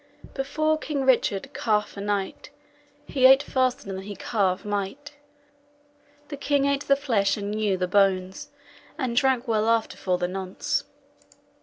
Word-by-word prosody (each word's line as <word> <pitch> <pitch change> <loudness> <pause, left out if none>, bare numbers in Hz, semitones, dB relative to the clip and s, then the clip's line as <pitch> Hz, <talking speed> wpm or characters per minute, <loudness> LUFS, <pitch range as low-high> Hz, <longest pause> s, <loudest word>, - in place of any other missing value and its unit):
Before 310 +3 0
King 285 -4 -2
Richard 235 -6 +1
carff 210 -2 0
a 200 - -6
knight, 200 -1 -3 0.6
He 260 -2 +4
ate 270 +2 +6
faster 255 -1 0
than 190 -1 -5
he 200 +1 -8
carve 190 -2 -1
might. 205 +8 -4 1.2
The 285 - -6
king 280 0 +1
ate 280 0 0
the 275 - +5
flesh 230 -9 +1
and 205 0 -4
GNEW 210 -2 0
[Gnawed] - - -7
the 180 - +1
bones, 190 -1 +1 0.5
And 255 -6 -2
drank 260 0 +2
well 220 -1 +1
after 230 -1 +1
for 180 -1 0
the 180 0 -1
nonce. 185 0 -3
215 Hz, 155 wpm, -25 LUFS, 195-270 Hz, 1.2 s, ate